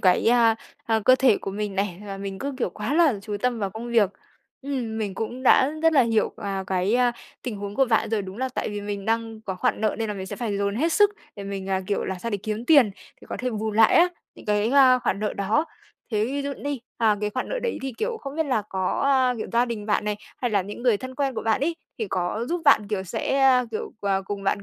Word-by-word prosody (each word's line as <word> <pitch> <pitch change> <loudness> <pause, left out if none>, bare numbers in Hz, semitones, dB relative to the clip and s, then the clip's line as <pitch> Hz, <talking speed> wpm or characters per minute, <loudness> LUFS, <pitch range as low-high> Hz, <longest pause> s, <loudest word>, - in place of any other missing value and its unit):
cái, 180 -1 +3
a, 230 -2 +5 0.3
à, 225 -1 +1
cơ 255 - +7
thể 255 -6 +4
của - - -5
mình 205 0 -3
này, 195 -2 -2
và 195 -1 -5
mình 195 -1 -5
cứ, 280 +4 -3
kiểu, 190 - 0
quá 215 +9 -3
là 315 -7 +5
chú 210 -1 -4
tâm 250 -2 +1
vào 200 -2 -2
công 235 +4 -7
việc. 215 -5 +4 0.5
Ừm, 250 -6 -3
mình 200 -3 -3
cũng 240 +5 -4
đã 260 +2 +5
rất 325 0 +5
là 270 -4 +6
hiểu, 225 -2 +1
à, 195 -2 -3
cái, 190 +3 +1
a, 245 -1 +3 0.3
tình 240 -5 -4
huống 200 0 -6
của 270 - +4
bạn 225 -2 +1
rồi. 215 -3 0
Đúng 190 +3 -8
là 260 0 -1
tại 255 - -3
vì 205 -1 -4
mình 200 -1 -5
đang 225 0 -1
có 195 -4 -4
khoản 185 - 0
nợ 215 - +1
nên 225 -1 -1
là 210 - -2
mình 190 -1 -6
sẽ 200 - -6
phải 220 -4 -2
dồn 200 0 -1
hết 325 +6 +1
sức 415 +2 +5 0.3
để 200 - -7
mình, 195 -1 -5
à, 190 0 +1
kiểu, 200 - -1
là 190 - -2
sao 230 +5 -4
để 205 - 0
kiếm 215 +2 -3
tiền 280 -9 +6 0.3
thì - - -15
có - - -3
thể 255 0 -2
bù 220 -1 -2
lại 220 +1 +5
á, 350 +1 +6 0.3
những - - -15
cái, 210 +2 +1
ơ, 260 -2 +6
khoản 200 -5 0
nợ 210 - -1
đó. 210 +11 +1 0.5
Thế 210 0 +2
ví 280 +4 -2
dụ 280 0 -3
đi, 285 -3 -3 0.2
à, 220 -3 +3
cái 210 0 -1
khoản 255 - -3
nợ - - -2
đấy 470 - -1
thì, 265 -1 -3
kiểu, 465 0 -1
không 275 +2 -7
biết 320 -2 0
là 250 -6 +1
có, 190 -1 -1
ơ, 260 -2 +3
kiểu, - - -3
gia 240 +1 +4
đình 225 -3 -5
bạn 210 0 +1
này, 210 -1 -1 0.2
hay 245 - -2
là 200 -3 +2
những 205 +4 -8
người 240 -4 +4
thân 260 +3 -8
quen 275 -2 -1
của - - -3
bạn 225 +3 +1
ấy, 330 +3 0 0.2
thì 220 -3 -2
có 185 +5 -1
giúp 350 0 -1
bạn, 215 -8 +5
kiểu, 205 -3 -1
sẽ, 230 +8 -1
ơ, 250 -2 +5
kiểu, 220 - -4
ờ, 195 -1 0
cùng 200 0 -5
bạn, 200 +1 0
220 Hz, 275 wpm, -24 LUFS, 200-255 Hz, 0.5 s, cơ